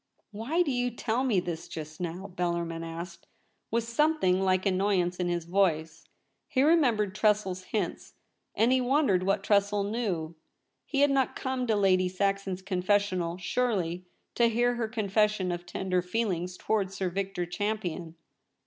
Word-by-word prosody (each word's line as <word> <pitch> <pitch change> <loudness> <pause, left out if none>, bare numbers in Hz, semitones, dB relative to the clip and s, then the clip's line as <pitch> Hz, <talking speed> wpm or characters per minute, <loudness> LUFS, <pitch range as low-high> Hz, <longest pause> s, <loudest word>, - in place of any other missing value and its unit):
* - - -44
Why 250 +12 0
do 295 - -1
you 245 -1 0
tell 240 +1 -1
me 230 -8 +2
this 170 -2 -5
just 155 +1 -8
now 175 +2 -4
?' 180 - -19
Bellarmin 170 -1 -2
asked, 170 +1 -7 0.4
with 230 +1 0
something 235 -6 +2
like 185 0 +2
annoy 195 0 +2
ance 175 0 -1
in 180 - -1
his 175 -1 -2
voice. 170 -3 0 0.4
He 260 - +2
remembered 245 - +3
Tressel's 210 -3 +1
hints, 200 -5 -3 0.4
and 230 +3 +3
he 260 0 +4
wondered 250 -7 +2
what 195 +1 0
Tressel 200 0 +2
knew. 200 -7 -2 0.5
He 280 -2 0
had 285 0 +5
not 270 -2 +1
come 260 -1 -2
to 220 - +2
Lady 185 -2 +3
Saxon's 195 0 -1
confessional, 185 -2 0
surely, 185 -4 -1 0.3
to 235 - +4
hear 240 +2 +2
her 235 -2 -2
confession 210 -3 +1
of 175 0 -5
tender 185 0 -1
feelings 180 -2 -2
towards 195 -3 -1
Sir 190 -2 -1
Victor 195 -1 -2
Champion. 175 -3 -3
195 Hz, 160 wpm, -29 LUFS, 180-225 Hz, 0.5 s, had